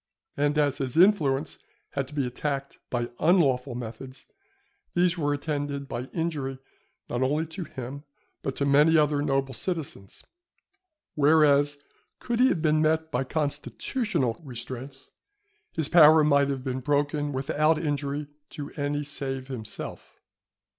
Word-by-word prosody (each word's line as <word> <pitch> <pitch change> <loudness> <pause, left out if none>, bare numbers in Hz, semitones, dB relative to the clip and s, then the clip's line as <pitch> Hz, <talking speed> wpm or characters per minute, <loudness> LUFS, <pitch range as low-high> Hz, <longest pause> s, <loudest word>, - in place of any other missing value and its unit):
And 145 +1 +1
as 145 -2 +2
his 130 +1 -2
influence 160 -7 +3 0.3
had 140 -2 -2
to 150 - -12
be 140 -3 +1
attacked 140 +2 -4
by 120 -1 -2
unlawful 140 -7 +3
methods, 125 +3 -8 0.7
these 175 0 +3
were 145 -4 0
attended 145 -1 -3
by 125 -1 -4
injury 145 -4 -3 0.5
not 120 - -2 0.3
to 185 +2 -5
him 130 -6 -7
only, 140 +1 -9 0.4
but 135 - -3
to 140 - -1
many 150 +4 +5
other 150 -1 +3
noble 135 -2 0
citizens; 135 - -4 0.9
whereas, 145 -1 +4 0.4
could 240 -1 -3
he 255 - +6
have 165 - -1
been 155 -1 +3
met 160 +1 +1
by 125 -1 0
constitutional 150 - -2
restraints, 130 +1 -7 0.6
his 160 -3 0
power 155 -2 +7
might 140 -1 +4
have 135 -2 -3
been 130 -1 -2
broken 145 +2 0
without 150 +3 +1
injury 145 -1 -2 0.2
to 145 -1 -7
any 145 0 -2
save 135 -2 -4
himself. 110 -5 -6
145 Hz, 135 wpm, -27 LUFS, 135-155 Hz, 0.9 s, power